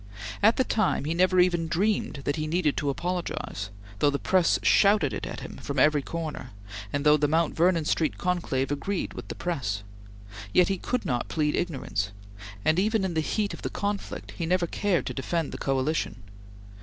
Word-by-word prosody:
At 220 +3 +6
the 260 - +4
time 215 - +1
he 155 - 0
never 185 +1 +3
even 175 -2 +3
dreamed 185 -3 0
that 145 - +1
he 155 -1 -2
needed 160 -2 +1
to 145 - 0
apologize, 170 - -3 0.3
though 145 - +4
the 140 - 0
press 180 +3 +3
shouted 200 -9 +4
it - - -4
at - - -6
him - - -8
from 140 0 -5
every 150 +2 +4
corner, 155 -6 -5 0.4
and 145 +1 -2
though 150 0 +7
the 145 0 +2
Mount 160 +2 +1
Vernon 170 -1 +3
Street 155 0 0
conclave 170 -7 -1
agreed 175 +7 -2
with 120 -4 -8
the - - -6
press; 105 - -2 0.7
yet 180 0 +5
he 195 - 0
could 250 -1 -2
not 120 -2 -1
plead 150 -2 0
ignorance, 130 - -2 0.5
and 155 +3 +4
even 215 0 +2
in 185 - -2
the 160 - +1
heat 205 +6 -1
of - - -8
the - - -3
conflict, 205 -1 -4
he 165 - -4
never 180 0 +2
cared 185 +1 0
to - - -3
defend 160 +4 -2
the - - -6
coalition. 135 +1 -1
165 Hz, 195 wpm, -27 LUFS, 145-185 Hz, 0.7 s, though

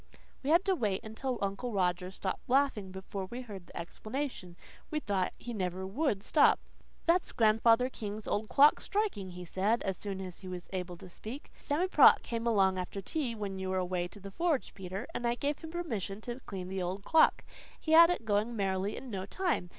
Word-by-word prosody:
We 275 - -3
had 340 +4 +5
to 390 - +3
wait 210 - -1
until 240 +4 -3
Uncle 200 +5 -2
Roger 180 -1 +1
stopped 190 +3 -5
laughing 255 -7 +2
before 190 +1 -5
we 240 +6 -6
heard 200 -7 -9
the - - -11
explanation. 215 +1 -5 0.3
We 305 - -1
thought 195 -8 0
he 240 - -6
never 185 -2 -2
WOULD 205 -1 0
stop. 295 - +5 0.5
"That's 345 +2 +3
Grandfather 225 +2 +4
King's 215 -4 -6
old 215 +1 -1
clock 290 +2 +6
striking," 400 - -1
he 180 0 -8
said, 200 +7 +1
as 190 -2 -2
soon 195 -2 -4
as 185 -2 -7
he 190 - -10
was 180 -1 -6
able 180 -1 -4
to 185 - -11
speak. 220 +10 -9
"Sammy 315 +6 0
Prott - - +7
came 230 0 -3
along 190 -4 +3
after 185 +2 -4
tea, 245 +3 -2
when 200 -3 -4
you 190 0 -3
were 190 - 0
away 180 -1 -1
to 190 - -13
the 195 0 -9
forge, 325 - 0
Peter, 190 +1 -5
and 240 - -1
I 235 - +1
gave 285 +3 -2
him 320 - -8
permission 225 - -3
to 240 +2 -5
clean 185 -2 -5
the 190 0 -2
old 185 +3 -3
clock. 320 +7 +4 0.4
He 315 - -3
had 335 +1 +9
it 355 -10 -1
going 215 +2 +1
merrily 195 0 -1
in 260 - -8
no 190 -1 -4
time. 345 - -1
205 Hz, 205 wpm, -32 LUFS, 190-260 Hz, 0.5 s, had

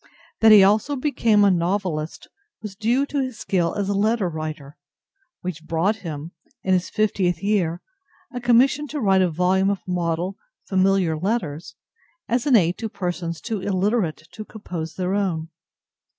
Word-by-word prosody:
That 220 -1 +6
he 210 -2 +9
also 215 +8 +2
became 235 -7 +2
a 200 - +5
novelist 175 -3 -2 0.4
was 205 -2 -7
due 235 +6 +1
to 285 0 -2
his 255 -3 -4
skill 175 -3 -1
as 200 -1 -1
a 205 - 0
letter 210 0 +1
writer, 155 -3 -6 0.7
which 170 -3 -5
brought 170 +7 0
him, 160 -4 -7 0.3
in 190 - +1
his 180 -1 +1
fiftieth 195 -5 0
year, 185 -5 0 0.5
a 245 - -4
commission 255 +5 +3
to 295 +1 -4
write 195 -5 +3
a 185 - +3
volume 185 +4 +2
of 200 -2 -3
model 175 +1 -2 0.3
"familiar 190 -3 +2
letters" 170 -3 -3 0.5
as 240 +3 0
an 270 - +5
aid 175 -4 +3
to 225 - -3
persons 175 -4 -4
too 220 -4 -4
illiterate 190 -4 -1
to 215 - -8
compose 175 -8 -7
their 185 0 -2
own. 175 -6 -1
190 Hz, 160 wpm, -23 LUFS, 170-215 Hz, 0.7 s, he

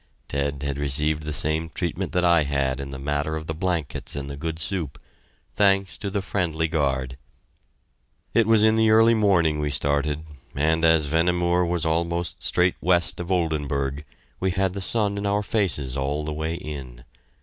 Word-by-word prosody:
Ted 70 0 -2
had 70 0 -3
received 75 +2 +1
the 75 0 -4
same 80 +2 -1
treatment 90 +1 -2
that 90 0 +1
I 85 -2 +5
had 70 -2 -1
in 70 0 -5
the 70 - -6
matter 75 +3 -2
of 80 0 -5
the 80 - -3
blankets 85 -3 -3
and 70 0 -5
the - - -5
good 80 +2 -4
soup 80 -3 -3 0.5
thanks 100 -2 +2
to 100 - -3
the 100 0 -2
friendly 80 -5 -1
guard. 70 -5 -1 1.2
It 115 -2 +3
was 110 -1 +5
in 110 0 +4
the 110 0 +4
early 115 +1 +6
morning 90 -8 +3
we 75 0 -1
started, 70 +2 +1 0.3
and 80 +3 +1
as 80 -2 +5
Vehnemoor 85 +3 +2
was 85 -2 -1
almost 85 +2 -1
straight 90 0 +1
west 85 -2 +2
of 90 +1 -4
Oldenburg, 75 -5 -1 0.4
we 95 - +1
had 95 0 0
the 100 - -5
sun 100 0 0
in 100 - -2
our 100 +1 +1
faces 80 - 0
all 70 +2 -2
the 75 - -3
way 80 +2 -2
in. 65 -7 -8
80 Hz, 180 wpm, -24 LUFS, 70-90 Hz, 1.2 s, early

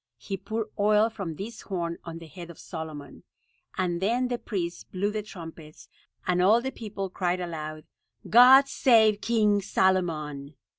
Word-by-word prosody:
He 195 - -5
poured 215 +3 -4
oil 210 +2 +3
from 195 -7 -5
this 220 +7 -7
horn 170 -4 -4
on 165 -1 -7
the 165 - -10
head 170 +2 -10
of 170 - -11
Solomon, 155 -5 -8 0.6
and 175 -2 -1
then 240 +5 +1
the 245 -1 -2
priests 175 -5 -4
blew 200 +3 -2
the 215 0 -3
trumpets, 165 -6 -11 0.4
and 180 0 +1
all 210 +6 +5
the 265 +2 -4
people 205 -5 -6
cried 180 -1 -2
aloud, 155 -3 -6 0.4
"God 260 +4 +8
save 220 -6 +4
King 210 -3 +2
Solomon." 155 -7 0
190 Hz, 155 wpm, -27 LUFS, 170-215 Hz, 0.6 s, God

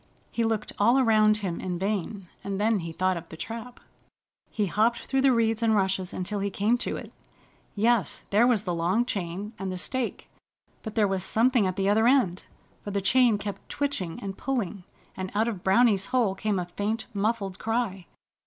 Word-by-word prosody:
He 235 - 0
looked 225 -2 -1
all 235 +6 +5
around 215 -4 +4
him 190 -5 -3
in 180 -2 -3
vain, 195 0 -3 0.2
and 200 -1 -3
then 215 0 +2
he 165 -1 -5
thought 185 +2 0
of 170 0 -9
the 160 - -9
trap. 230 +6 -7 0.7
He 210 - -1
hopped 220 +5 +1
through 270 0 +1
the 270 0 +5
reeds 225 -2 +1
and 225 -1 +3
rushes 190 -2 0
until 200 +3 -3
he 200 +1 -1
came 205 +4 +1
to - - -2
it. - - -9 0.6
Yes, 220 -4 +2
there 215 +4 +5
was 225 -5 +2
the 180 -4 -2
long 180 +8 +1
chain, 195 -1 -4
and 190 -1 -3
the 185 - -4
stake, 250 +6 -2 0.5
but 220 -2 -7
there 215 -3 +3
was 190 -2 -1
something 230 0 +3
at 185 - -2
the 195 -1 0
other 220 +3 +4
end, 245 -9 +2 0.4
for - - -5
the 200 0 -1
chain 235 +2 +4
kept 205 -1 -7
twitching 275 - -2
and 195 -1 -6
pulling. 215 -8 -2 0.3
And 185 0 -5
out 220 +2 +2
of 205 -6 -4
Browny's 195 0 +4
hole 245 -6 +2
came 205 +1 -1
a 180 - -1
faint, 205 +6 -3
muffled 200 -2 -1
cry. 220 -5 -2
205 Hz, 195 wpm, -27 LUFS, 190-230 Hz, 0.7 s, all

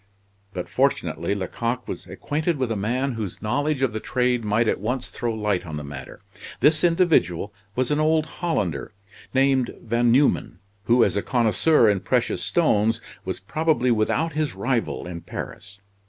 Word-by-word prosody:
But 90 -2 -5
fortunately 85 +5 0
Lecoq 115 +5 -3
was - - -6
acquainted 155 +2 -2
with 130 -3 -1
a - - 0
man 125 +7 -1
whose 110 -6 -5
knowledge 140 +5 0
of 125 -5 +1
the 110 - -2
trade 125 0 0
might 110 +2 +1
at - - +1
once 125 +6 -3
throw 120 - -2
light 105 -4 -1
on 80 -4 -6
the 75 - -5
matter. 70 -2 -9 0.4
This 150 +4 +4
individual 160 - +2 0.2
was 130 +1 0
an 150 - +2
old 155 0 +3 0.2
Hollander, 100 - -1 0.4
named 135 -2 +2
Van 115 +1 +1
Numen, 135 +4 +2 0.3
who 120 0 +5
as - - +1
a 100 - +1
connoisseur 120 +3 +3
in 100 -2 +3
precious - - 0
stones, 110 +2 +2 0.3
was - - -3
probably 130 - +1
without 120 +8 +1
his 150 -6 -1
rival 115 +2 -1
in 85 -1 -6
Paris. 95 +3 -8
120 Hz, 165 wpm, -24 LUFS, 105-140 Hz, 0.4 s, who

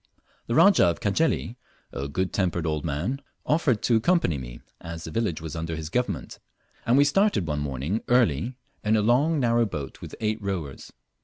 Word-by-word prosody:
The 115 - -1
Rajah 200 - +6
of 85 - 0
Cajeli, 120 +2 0 0.4
a 70 - -3
good 95 +6 -2
tempered 90 -3 0
old 75 -2 -1
man, 85 - -2 0.2
offered 145 -8 +1
to 115 - +4
accompany 110 - +2
me, - - -8 0.2
as 85 0 -7
the 80 - -7
village 100 -6 -1
was 80 -3 -6
under 80 0 -3
his 80 -1 -5
government; 125 +3 -2 0.5
and 120 +3 +4
we 140 - +7
started 195 - +2
one 75 -2 -2
morning 75 - -2
early, 120 - +2 0.3
in 105 +1 +2
a 110 - +3
long 140 +8 +3
narrow 120 -2 +2
boat 75 -8 -6
with - - -8
eight 110 0 -1
rowers. 90 -9 -5
100 Hz, 180 wpm, -26 LUFS, 80-125 Hz, 0.5 s, we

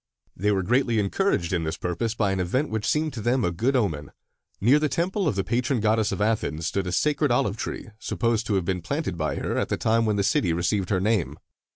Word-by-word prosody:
They 105 +3 +1
were 95 -2 +1
greatly 120 +2 +2
encouraged 100 - 0
in 85 -2 0
this 80 +1 -3
purpose 100 +6 -2
by 105 -4 +1
an 95 - -1
event 125 - 0
which 110 -1 -2
seemed 155 0 +1
to 115 - -5
them 120 +2 +1
a 90 - +1
good 120 +11 0
omen. 80 - 0 0.5
Near 125 +9 +5
the 150 0 0
temple 180 +6 0
of 140 - +1
the 95 - 0
patron 120 +5 0
goddess 110 0 +2
of - - -3
Athens 105 -7 0
stood 95 +4 -1
a - - -2
sacred 150 - +1
olive 100 -4 +1
tree, 110 - -5
supposed 115 -1 -1
to 105 - +1
have 95 -3 0
been 90 0 -1
created 140 - -3
by 75 -2 -2
her - - -2
at - - -1
the - - 0
time 115 0 +2
when 105 - +1
the 100 - +1
city 90 -3 +2
received 90 +3 0
her 95 - +2
name. 105 -2 0
105 Hz, 240 wpm, -25 LUFS, 90-125 Hz, 0.5 s, Near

